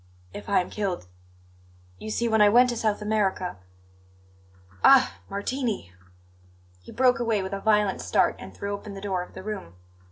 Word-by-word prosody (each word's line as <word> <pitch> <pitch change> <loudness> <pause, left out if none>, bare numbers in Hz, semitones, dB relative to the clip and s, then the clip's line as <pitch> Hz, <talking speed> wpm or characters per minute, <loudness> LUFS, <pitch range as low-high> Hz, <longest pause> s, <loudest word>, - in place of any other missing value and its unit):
"If 105 - -8
I - - +4
am 180 - -8
killed 195 - -3 0.9
You 215 - -7
see, 235 +2 0
when 220 -1 +3
I 205 - +7
went 245 +4 +5
to - - -3
South 215 -2 -1
America 200 - -1 1.3
Ah, 265 -1 +6
Martini!" 205 - -3 0.9
He - - -13
broke 250 -1 +3
away 225 -4 0
with 190 +1 -5
a 195 - -4
violent 210 -2 +2
start - - +2
and 95 - -9
threw 200 - -5
open 200 0 -7
the - - -7
door 190 -3 -2
of 180 - -10
the - - -8
room. 200 - -6
210 Hz, 170 wpm, -26 LUFS, 190-225 Hz, 1.3 s, I